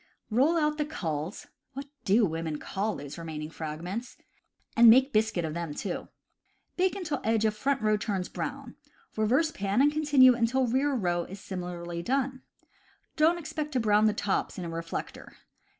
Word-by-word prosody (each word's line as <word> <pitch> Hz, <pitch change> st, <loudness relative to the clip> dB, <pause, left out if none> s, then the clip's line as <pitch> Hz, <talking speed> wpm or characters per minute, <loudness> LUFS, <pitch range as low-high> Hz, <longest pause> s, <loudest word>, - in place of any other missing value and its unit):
Roll 280 Hz, +9 st, +3 dB
out 300 Hz, -1 st, +1 dB
the -, -, +2 dB
culls 165 Hz, -, -4 dB, 0.3 s
(what 275 Hz, +1 st, -6 dB, 0.2 s
do 210 Hz, +3 st, +4 dB
women 160 Hz, -3 st, -3 dB
call 205 Hz, +6 st, -3 dB
those 145 Hz, +3 st, -8 dB
remaining 155 Hz, -1 st, -6 dB
fragments 170 Hz, +10 st, -6 dB, 0.3 s
?) -, -, -40 dB
and 230 Hz, 0 st, +8 dB
make 260 Hz, +4 st, +6 dB
biscuit 215 Hz, -5 st, +1 dB
of 155 Hz, -, -4 dB
them 165 Hz, -3 st, -4 dB
too. 185 Hz, +2 st, -4 dB, 0.7 s
Bake 370 Hz, +1 st, +1 dB
until 340 Hz, -7 st, -3 dB
edge 220 Hz, 0 st, +2 dB
of 215 Hz, -1 st, +1 dB
front 270 Hz, +2 st, 0 dB
row 215 Hz, 0 st, +3 dB
turns 195 Hz, -4 st, -2 dB
brown; -, -, -6 dB, 0.4 s
reverse 255 Hz, +9 st, +2 dB
pan 200 Hz, -6 st, -1 dB
and 290 Hz, +2 st, +5 dB
continue 290 Hz, -4 st, +6 dB
until 245 Hz, +2 st, +1 dB
rear 265 Hz, +5 st, +1 dB
row 175 Hz, -6 st, 0 dB
is 195 Hz, +2 st, -9 dB
similarly 175 Hz, -3 st, -5 dB
done. 260 Hz, +4 st, -1 dB, 0.7 s
Don't 320 Hz, +3 st, +4 dB
expect 305 Hz, -2 st, -5 dB
to 255 Hz, -, +2 dB
brown 210 Hz, -1 st, +3 dB
the 215 Hz, -, +3 dB
tops 205 Hz, -2 st, -1 dB
in 180 Hz, -, -4 dB
a -, -, -4 dB
reflector. 165 Hz, 0 st, -6 dB
215 Hz, 170 wpm, -28 LUFS, 175-270 Hz, 0.7 s, and